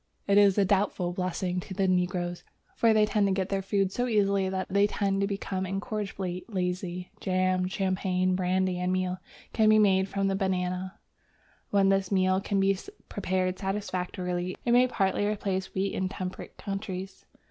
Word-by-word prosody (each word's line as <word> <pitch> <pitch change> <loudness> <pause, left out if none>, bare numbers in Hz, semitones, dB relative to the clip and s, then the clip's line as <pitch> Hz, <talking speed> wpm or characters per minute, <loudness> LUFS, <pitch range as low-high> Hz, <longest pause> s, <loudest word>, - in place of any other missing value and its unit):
It 200 0 +5
is 200 -1 +5
a 200 - +4
doubtful 190 -2 +1
blessing 180 0 -2
to 190 +1 -7
the 195 0 +1
negroes, 180 -1 0 0.3
for 230 - +4
they 215 -1 +5
get 200 -3 +1
their 195 -1 0
food 195 0 0
so 245 +4 -1
easily 200 -4 +2
that 190 0 -2
they 200 +1 +3
tend 195 -1 0
to 200 - +2
become 195 -1 -3
incorrigibly 195 -2 -3
lazy. 180 -3 -3
Jam, 185 0 +1
champagne, 185 -1 0
brandy, 185 0 0
and 180 0 0
meal 185 0 -1 0.3
can 220 -1 +4
be 215 - +6
made 195 -2 +4
from 195 0 0
the 195 - +1
banana. 185 -1 -2 0.7
When 195 -1 +3
this 195 -1 +1
meal 185 0 +2
can 200 0 0
be 195 0 +3 0.3
prepared 185 -2 -1
satisfactorily, 185 -2 -3
it 240 - +2
may 250 +1 +6
partly 200 -3 0
replace 195 -2 -2
wheat 195 +1 0
in 185 0 -1
temperate 185 -1 -6
countries. 195 -1 -5
190 Hz, 165 wpm, -28 LUFS, 185-200 Hz, 0.7 s, be